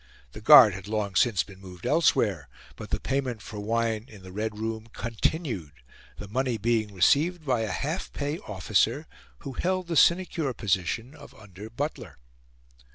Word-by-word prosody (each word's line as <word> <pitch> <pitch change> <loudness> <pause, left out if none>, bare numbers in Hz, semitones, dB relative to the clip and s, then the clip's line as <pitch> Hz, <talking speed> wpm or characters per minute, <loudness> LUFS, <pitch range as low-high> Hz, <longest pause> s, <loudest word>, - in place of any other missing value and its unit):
The 105 - -10
guard 125 -4 +9
had 95 0 -8
long 105 -2 -2
since 100 +2 +3
been 95 -2 -15
moved 90 -2 -12
elsewhere, 165 +2 +2 0.3
but - - -9
the - - -1
payment 135 -4 -2
for 105 0 -8
wine 115 +1 -1
in 105 -7 -14
the 95 - -11
Red 105 +2 -4
Room 110 0 -4
continued, 115 - -2 0.4
the 105 - -8
money 125 +3 -1
being 110 -1 0
received 155 - +2
by 125 -4 +1
a 110 - -2
half 155 +6 -3
pay 145 +3 -3
officer 105 - 0 0.4
who 135 - -7
held 185 +5 -1
the 170 0 -3
sinecure 170 -4 +3
position 100 - -1
of 160 - -14
under 105 0 -11
butler. 120 - -5
115 Hz, 160 wpm, -27 LUFS, 105-140 Hz, 0.4 s, guard